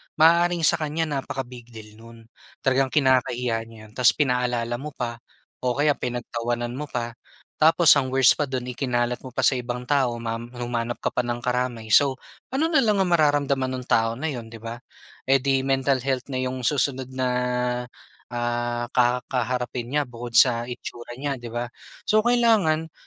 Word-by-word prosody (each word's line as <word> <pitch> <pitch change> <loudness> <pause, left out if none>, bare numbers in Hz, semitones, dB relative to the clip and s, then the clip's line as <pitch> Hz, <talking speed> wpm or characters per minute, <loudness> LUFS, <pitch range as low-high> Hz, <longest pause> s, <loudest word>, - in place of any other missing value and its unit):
maaaring 170 +2 +4
sa - - +4
kanya 155 +1 -2
napaka-big 125 -3 -7
deal 110 -1 -11
no'n. 115 0 -14 0.4
Talagang 135 0 +3
kinakahiya 125 -4 +1
niya 115 0 -14
'yon. - - -20
Tapos 125 -2 +5
pinaalala 125 -3 0
mo 150 +1 -7
pa 120 -2 -4 0.4
o 125 -1 -1
kaya 145 +1 +3
pinagtawanan 120 0 -3
mo 145 +4 -5
pa. 120 -3 -3 0.5
Tapos 165 +1 +5
ang 135 -2 +1
worst 135 -2 +5
pa 150 - +1
do'n, 130 -2 -4
ikinalat 125 -1 -1
mo 130 - -9
pa - - 0
sa 135 - +4
ibang 125 0 -4
tao 135 -5 +2
ma 115 0 -2
humanap 120 0 -4
ka - - +2
pa - - -2
ng 120 0 -3
karamay. 125 -3 -2
So, 140 +2 +6 0.4
ano 310 +5 +1
na 310 - +4
lang 210 -2 +3
ang 185 - +1
mararamdaman 140 -4 +2
no'ng 125 -1 -7
tao 115 0 +3
na 155 +6 -3
'yon, 120 -4 -6
'di 115 - -10
ba? 115 +1 -5 0.5
Eh 135 0 +4
di, 135 -1 +1
mental 135 0 +2
health 130 0 -2
na 130 - -3
'yong 130 0 -3
susunod 130 0 0
na, 130 -1 -2 1.0
ah, 120 0 -2
kakaharapin 125 0 0
niya 145 +2 0
bukod 120 -1 -4
sa 120 -1 +4
itsura 120 0 -8
niya, 140 +1 -2
'di 120 - -7
ba? 120 +1 -3 0.4
So, 215 0 +4
kailangan 215 -10 +2
125 Hz, 175 wpm, -24 LUFS, 120-140 Hz, 1.0 s, So